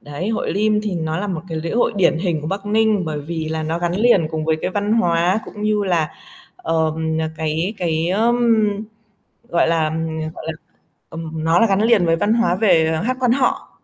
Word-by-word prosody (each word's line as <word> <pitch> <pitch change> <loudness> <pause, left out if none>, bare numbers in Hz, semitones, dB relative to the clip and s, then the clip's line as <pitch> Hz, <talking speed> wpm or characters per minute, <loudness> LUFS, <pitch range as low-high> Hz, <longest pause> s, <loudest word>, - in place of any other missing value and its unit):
Đấy, 145 +8 -5
hội 225 - -1
Lim 210 +1 +1
thì 205 -4 -2
nó 160 -1 -2
là 205 - -2
một 175 -5 -3
cái 160 -1 -3
lễ 165 +1 -4
hội 235 0 +1
điển 170 -3 +3
hình 170 -4 -1
của 150 - -6
Bắc 195 +3 -4
Ninh, 215 -3 +2
bởi 150 -2 -3
vì 160 +1 -4
là 160 0 -2
nó 160 +2 -2
gắn 175 0 -1
liền 205 -8 +3
cùng 155 -1 -3
với 160 0 +1
cái - - -2
văn 205 +2 -1
hóa, 175 -1 +2
cũng 210 - -9
như 210 -1 +1
là, 165 -5 0 0.5
ờ, 160 -1 0 0.4
cái 160 +6 -2
cái, 165 -1 0
ưm, 230 +5 +2 1.1
gọi 170 -1 +2
là, 160 -2 +1 0.4
gọi - - -9
là, 160 - -2 0.6
ừm, 160 -1 -6
nó 165 +2 +3
là 230 - +4
gắn 195 +1 +2
liền 220 -6 +4
với 165 0 +3
văn 205 +6 +1
hóa 230 -6 +2
về, 175 -7 +3
à, 160 - -1
hát 255 +4 -1
Quan 250 -2 +2
họ. 255 0 0
175 Hz, 215 wpm, -20 LUFS, 160-210 Hz, 1.1 s, là